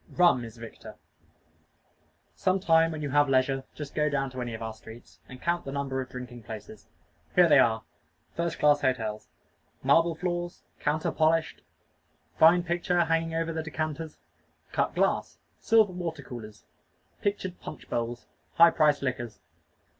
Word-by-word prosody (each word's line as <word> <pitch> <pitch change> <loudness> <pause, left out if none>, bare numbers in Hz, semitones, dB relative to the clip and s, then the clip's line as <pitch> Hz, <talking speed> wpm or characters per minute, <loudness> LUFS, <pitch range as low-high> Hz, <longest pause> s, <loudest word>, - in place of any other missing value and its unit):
Rum 175 -9 +5
is 115 0 -10
victor. 115 -1 -10 1.4
Some 185 +1 +1
time 165 -2 +4
when 155 -1 -5
you 145 - -3
have 145 0 +4
leisure, 135 0 +2
just 150 -2 -7
go 150 0 +1
down 135 -2 -1
any 120 -2 -4
of 110 - -9
our 110 0 -4
streets, 115 +2 -14
and 130 - -10
count 170 +3 -1
the 135 - -6
number 135 -1 -2
of 130 - -7
drinking 125 -1 -8
places. 110 -1 -10 0.5
Here 180 -1 +7
they 145 -3 +6
are 110 -3 +3 0.5
first 170 -1 -2
class 145 -1 +4
hotels. 110 -5 -1 0.6
Marble 165 +5 +4
floors. 175 0 -3 0.2
Counter 155 +1 0
polished. 160 0 +1 0.7
Fine 170 +2 +6
picture 175 0 +1
hanging 165 0 0
over 165 0 -1
the 160 - -2
decanters. 155 0 -4 0.5
Cut - - 0
glass. - - 0 0.2
Silver 220 -4 +4
water 165 -5 -5
coolers. 110 -4 -10 0.6
Pictured 195 -3 -2
punch 155 - -9
bowls. 120 +1 -3 0.3
High 170 0 +8
priced 150 -3 +3
liquors. 120 -4 -3
150 Hz, 150 wpm, -28 LUFS, 125-165 Hz, 1.4 s, High